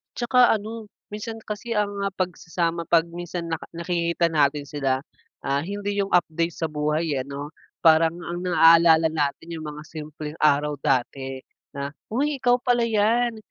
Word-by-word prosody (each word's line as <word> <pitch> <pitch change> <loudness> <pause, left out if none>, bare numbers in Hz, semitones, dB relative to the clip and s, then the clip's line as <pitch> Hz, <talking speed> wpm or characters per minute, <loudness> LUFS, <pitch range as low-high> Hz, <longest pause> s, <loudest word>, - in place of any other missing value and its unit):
'Tsaka 245 -1 +4
ano, 220 +1 -8 0.2
minsan 215 +2 -5
kasi 220 +2 -5
ang 205 -1 +1
mga 200 0 -2
pagsasama 170 -2 -2
pag 165 -1 +4
minsan 175 0 -5
nak 160 - -2
nakikita 170 0 0
natin 145 -1 +2
sila, 135 -2 -1 0.5
ah, 140 0 +1
hindi 205 +4 -3
yung 195 - -2
update 170 -1 +1
sa 165 - -1
buhay, 150 -1 0
eh, - - -2
ano, 140 +2 -7 0.3
parang 160 0 +5
ang 175 0 -4
naalala 165 -2 +6
natin 155 +2 -2
yung 160 - -6
mga 150 +1 -9
simpleng 155 -1 -7
araw 150 0 +3
dati 130 +1 -1 0.4
na, 140 0 -4 0.2
"Uy 285 +5 0
ikaw 245 -1 +4
pala 245 -1 +2
yan, 230 +2 +2
170 Hz, 155 wpm, -24 LUFS, 150-205 Hz, 0.5 s, naalala